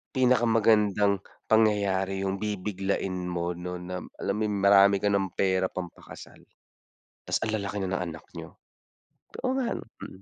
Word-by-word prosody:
pinakamagandang 110 -5 +3 0.3
pangyayari 100 -3 +2
'yong 95 0 -2
bibiglain 95 -3 -2
mo, 85 0 -2
'no, 90 +1 -5
nam 90 +1 -6
alam 100 - -2
mo - - -2
'yong, 105 -1 -2
marami 100 0 +7
ka 105 - +3
ng 95 -2 0
pera 95 -1 +2
pampakasal. 90 -2 -9 0.9
'Tas - - 0
ang 110 - -1
lalaki 100 0 -3
na 95 - -3
ng 90 -1 -1
anak 80 -1 -8 0.2
niyo. - - -10 0.9
Oo 260 - 0
nga, 260 -3 -1
'no, - - -11 0.2
mm. 95 - -10
100 Hz, 155 wpm, -27 LUFS, 95-105 Hz, 0.9 s, marami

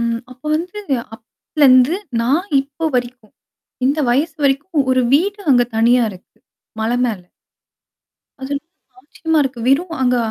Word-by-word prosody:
ம், 230 0 -1
அப்ப 255 - -22
வந்து 360 +5 -6 0.4
அப்பலருந்து 255 +5 +2 0.3
நான் 310 +11 0
இப்போ 285 +4 -5
வரைக்கும் 245 -3 -5 0.5
இந்த 285 +4 +1
வயசு 305 +6 0
வரைக்கும் 280 +2 +1
ஒரு 255 - +3
வீடு 400 +6 +1
அங்க 245 -1 +4
தனியா 240 +2 +4
இருக்கு 185 - -17 0.4
மலை 230 +3 0
மேல. 215 -5 -3 1.2
வி 265 - -16
அது 265 - -7
என்னமோ 280 -3 -11
ஆச்சரியமா 320 +3 -2
இருக்கு. 255 -3 -4
வெறும் 330 +5 +1
அங்க 250 -1 +2
270 Hz, 140 wpm, -18 LUFS, 245-320 Hz, 1.2 s, அங்க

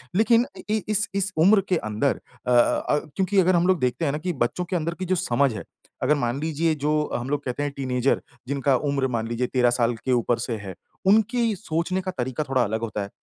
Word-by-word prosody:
लेकिन 230 +3 +4
अ, 280 - -12
इ 215 0 +1
इस 210 +1 +1
इस 195 0 0
उम्र 195 +5 +6
के 185 - +3
अंदर 110 +2 -1 0.3
अ - - +2
अ, 120 +4 +3 0.2
क्योंकि 195 +1 +2
अगर 185 0 +4
हम 175 +1 +3
लोग 185 -2 +3
देखते 125 +5 0
हैं 140 - +1
ना 150 - -2
कि 175 +3 -3
बच्चों 180 +9 -2
के 180 +1 -3
अंदर 170 0 -1
कि 185 - -2
जो 185 - +1
समझ 140 -6 +1
है, 105 - -6 0.4
अगर 145 +4 +3
मान 120 -1 -1
लीजिए 160 +1 0
जो 150 +1 -1 0.2
हम 120 +2 -3
लोग 145 0 -1
कहते 130 +3 -2
हैं 145 - -2
टीनएजर, 130 -1 0 0.3
जिनका 140 0 +1
उम्र 140 -1 +1
मान 115 -3 -2
लीजिए 120 +2 -1
13 125 -1 +2
साल 120 -1 +1
के 130 +3 -3
ऊपर 120 -1 +2
से 115 -1 -3
है, 100 -3 -7 0.3
उनकी 220 +2 +3
सोचने 180 0 -2
का 185 0 -4
तरीका 130 +4 -2
थोड़ा 130 -3 +1
अलग 110 +1 -2
होता 110 -2 -3
है। 100 - -7
145 Hz, 235 wpm, -24 LUFS, 125-185 Hz, 0.4 s, उम्र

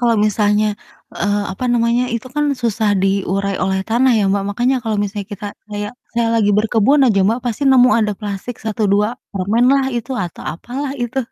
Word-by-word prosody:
kalau 235 -2 +2
misalnya, 210 0 +2 0.4
eee, 205 +1 0
apa 250 - -5
namanya, 240 +1 +1
itu 230 +2 -4
kan 295 0 +1
susah 225 -3 0
diurai 195 0 0
oleh 190 0 0
tanah 245 +3 +3
ya 205 - +2
Mbak. 200 0 0
Makanya 245 +5 +1
kalau 220 -2 -1
misalnya 205 -1 -4
kita 205 0 -7 0.2
kayak 205 +1 -4 0.2
saya 235 -1 +1
lagi 210 -2 +3
berkebun 225 +6 +3
aja 200 -4 +3
Mbak, 230 +4 +1
pasti 240 +2 -3
nemu 250 -1 +6
ada 215 -2 +2
plastik 210 +3 -5
1, 220 0 -3
2 205 +1 +3 0.3
permen 210 +6 +1
lah, 275 -1 +3
itu 240 +2 -3
atau 180 -4 -5
apalah 260 - -5
itu. 245 +1 -3
220 Hz, 185 wpm, -18 LUFS, 205-240 Hz, 0.4 s, nemu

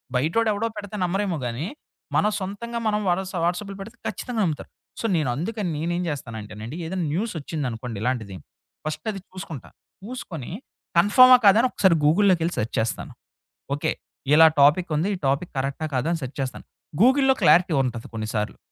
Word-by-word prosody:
బయటోడేవడో 210 - +1
పెడితే 205 0 -6
నమ్మరేమో 185 -1 0
గాని, 120 +7 -3 0.5
మనం 210 - +3
సొంతంగా 235 +5 -4
మనం 210 0 +1
వాట 175 +1 +2 0.3
వాట్సప్‌‌లో 195 +3 -2
పెడితే 225 +4 -10
ఖచ్చితంగా 240 -4 -3
నమ్ముతారు. 155 -3 -3 0.3
సో, - - -3
నేను 145 -6 +1
అందుకని 190 +3 -3
నేనేం 175 +3 -1
జేస్తానంటేనండి. 110 -1 -6
ఏదైనా 180 -1 -2
న్యూసోచ్చిందనుకోండి 140 - -3
ఇలాంటిది. 110 -7 -2 0.5
ఫస్ట్ 155 +6 -5
అది 195 - -7
చూసుకుంటా. 180 - -8 0.3
చూసుకొని 175 - -7 0.5
కన్‌ఫార్మా? 255 +7 +8
కాదని, 225 +6 +6
ఒకసారి 185 -4 +3
గూగుల్‌లోకెళ్ళి 175 0 +3
సెర్చ్ 110 - -2
చేస్తాను. 115 - -4 0.6
ఓకే. - - 0 0.4
ఇలా 160 +1 +9 0.2
టాపికుంది. 155 +3 +3
ఈ - - -11
టాపిక్ 140 +6 -1
కరక్టా 140 +4 -2
కాదా 130 +6 0
అని 165 - -3
సెర్చ్ 130 - -8
చేస్తాను. 130 -1 -5 0.4
గూగుల్‌లో 265 +1 +5
క్లారిటీ 175 -1 +5
ఉంటది 120 -3 -4
కొన్నిసార్లు. 110 -1 -3
170 Hz, 140 wpm, -24 LUFS, 135-205 Hz, 0.6 s, ఇలా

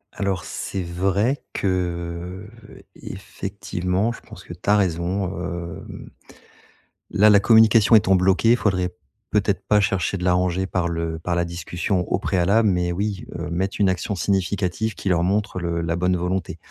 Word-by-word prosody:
Alors 95 -2 -2
c'est 95 - -4
vrai 95 +9 0
que, 90 0 -3 0.2
heu, - - -14
effectivement 95 +1 -3
je 115 - -10
pense - - -13
que - - -9
tu - - -6
as 105 - +6
raison, 90 0 0 0.2
hem, 85 -1 -7 1.0
là 105 +1 +5
la 105 -1 +7
communication 110 +1 +5
étant 95 -3 +5
bloquée, 95 +5 +4
faudrait 95 -6 0 0.4
peut-être 100 -2 0
pas 105 - +4
chercher 100 -1 0
de 90 - -6
l'arranger 90 +1 +1
par 90 -2 -1
le 85 -1 -3
par 85 +2 -2
la 85 0 +1
discussion, 90 +3 -2
au - - +3
préalable, 100 +4 +2
mais 90 -2 0
oui, 100 +2 -3
heu, 85 +1 -5
mettre 95 +3 -1
une 100 - +4
action 95 +2 -2
significative 95 +2 -1
qui 100 - -3
leur 85 -2 +2
montre 100 +2 0
le 85 -1 -2
la 85 0 -1
bonne 90 +1 +1
volonté, 90 0 -2
95 Hz, 160 wpm, -22 LUFS, 85-100 Hz, 1.0 s, la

